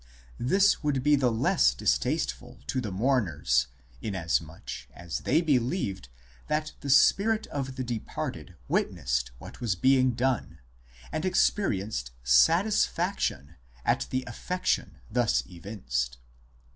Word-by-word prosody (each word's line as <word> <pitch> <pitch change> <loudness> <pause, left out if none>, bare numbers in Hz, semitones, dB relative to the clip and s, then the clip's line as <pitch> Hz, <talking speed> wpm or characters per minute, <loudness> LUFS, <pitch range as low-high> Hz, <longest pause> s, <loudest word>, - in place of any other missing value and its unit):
This 195 +11 +3
would 145 -4 0
be 150 +1 +5
the 130 -4 +2
less 65 - +3
distasteful - - -1
to 130 - -1
the 110 - -4
mourners 90 - +1 0.3
inasmuch 85 -5 -3
as 85 -1 -5
they 155 +5 +2
believed 125 - 0 0.4
that 155 0 -1
the 140 - -6
spirit 200 +11 +4
of 135 -2 -4
the 130 - -3
departed 120 -3 -5
witnessed 60 0 0
what - - -11
was 110 -6 0
being 130 +4 +4
done, 125 -9 -1 0.5
and 155 - -2
experienced 105 - +1
satis 165 - +5
faction 170 - -2 0.3
at - - +1
the 130 0 -1
affection 180 +10 -2
thus 120 0 +1
evinced." 75 - -4
120 Hz, 120 wpm, -28 LUFS, -, 0.5 s, be